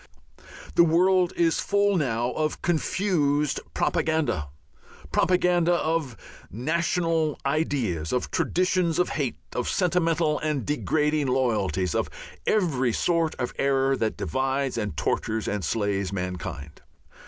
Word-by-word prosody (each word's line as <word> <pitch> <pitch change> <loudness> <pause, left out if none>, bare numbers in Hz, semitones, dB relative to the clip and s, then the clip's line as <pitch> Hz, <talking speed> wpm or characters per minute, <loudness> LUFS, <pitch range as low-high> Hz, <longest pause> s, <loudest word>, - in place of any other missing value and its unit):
The 170 - +6
world 180 +2 +3
is 165 -1 +2
full 200 0 +2
now 120 -6 0
of 155 +2 -2
confused 155 -4 +1 0.2
propaganda, 155 - 0 0.6
propaganda 180 -1 +3
of 160 -8 -1 0.3
national 160 - 0
ideas, 135 - -1
of 125 - -1
traditions 180 -2 +1
of 180 - +2
hate, 140 -6 -2 0.2
of 125 - -2
sentimental 165 -4 +1
and 150 -5 -2
degrading 150 0 0
loyalties, 105 -9 0
of - - 0 0.4
every 135 - +2
sort 165 +2 +1
of 125 - -3
error 135 0 +2
that 110 -4 -2
divides 135 0 -1
and 105 -9 -3
tortures 110 +8 -1
and 105 -2 -2
slays 100 0 -1
mankind. 90 -5 -5
150 Hz, 115 wpm, -25 LUFS, 115-170 Hz, 0.6 s, The